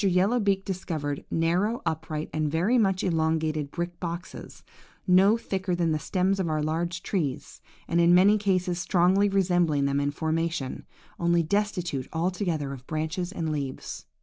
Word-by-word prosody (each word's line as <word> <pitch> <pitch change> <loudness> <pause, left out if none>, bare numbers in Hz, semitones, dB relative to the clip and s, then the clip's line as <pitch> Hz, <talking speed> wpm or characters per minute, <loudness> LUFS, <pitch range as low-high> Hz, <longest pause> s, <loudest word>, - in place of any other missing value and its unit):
Yellow 195 +5 +3
beak 195 -2 +1
discovered 160 -7 -3
narrow, 180 +8 0
upright, 160 -1 -3
and 155 -1 0
very 185 +11 +2
much 195 -4 +1
elongated 160 -3 0
brick 175 +2 -5
boxes, 170 0 -7 0.4
no 195 +4 +5
thicker 190 -4 -2
than 170 -2 +1
the 155 - 0
stems 190 +4 0
of 180 -3 0
our 155 -1 0
large 170 +3 -2
trees, 150 -10 -3 0.3
and 170 +1 +2
in 170 0 +5
many 195 +4 +6
cases 185 -3 0
strongly 185 +3 +3
resembling 175 -7 +2
them 140 0 +1
in 145 0 0
formation, 160 -2 -2 0.3
only 170 0 +2
destitute 175 -7 -1
altogether 165 -4 -1
of 130 -1 -11
branches 160 +3 -2
and 165 -5 -3
leaves. 140 -3 -5
170 Hz, 150 wpm, -27 LUFS, 155-190 Hz, 0.4 s, many